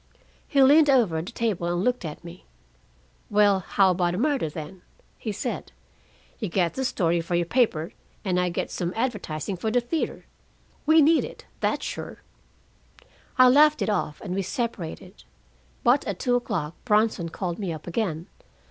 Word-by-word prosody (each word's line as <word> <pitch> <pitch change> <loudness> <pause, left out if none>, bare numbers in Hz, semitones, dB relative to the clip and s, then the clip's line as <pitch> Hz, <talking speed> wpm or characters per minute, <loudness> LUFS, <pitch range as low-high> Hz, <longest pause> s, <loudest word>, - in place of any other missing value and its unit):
"He 275 -2 +4
leaned 295 +3 +6
over 220 -12 +3
the 180 +8 -8
table 215 -8 -1
and 175 +1 -1
looked 250 -5 0
at 155 +1 -7
me. 170 +1 -12 0.8
'Well, 205 -2 +4
how 190 +1 +2
about 175 -1 0
a - - -3
murder, 270 - 0
then?' 160 +5 -8 0.4
he 220 - -3
said. 200 - -4 0.7
'You 215 -6 -3
get 175 -1 +1
the 265 - -3
story 170 -8 +1
for 170 +1 -2
your 170 0 +1
paper, 175 -7 +1 0.3
and 180 -2 +1
I 180 0 +1
get 170 - -3
some 175 0 -3
advertising 205 - -3
for 220 +5 -2
the 245 +3 +3
theater. 275 +7 -3 0.6
We 315 0 +6
need 320 +3 +4
it, - - -9
that's - - -1
sure.' - - -6 1.1
"I 255 0 +8
laughed 300 +3 +5
it - - 0
off, 165 -7 -2
and 180 - -5
we 195 - 0
separated. 195 -4 -5 0.6
But 255 +4 +4
at - - -2
two 250 - 0
o'clock 190 -10 -2
Bronson 210 -6 +1
called 175 +1 -4
me 190 -4 -2
up 155 -2 -7
again. 170 -3 -2
195 Hz, 170 wpm, -25 LUFS, 175-245 Hz, 1.1 s, I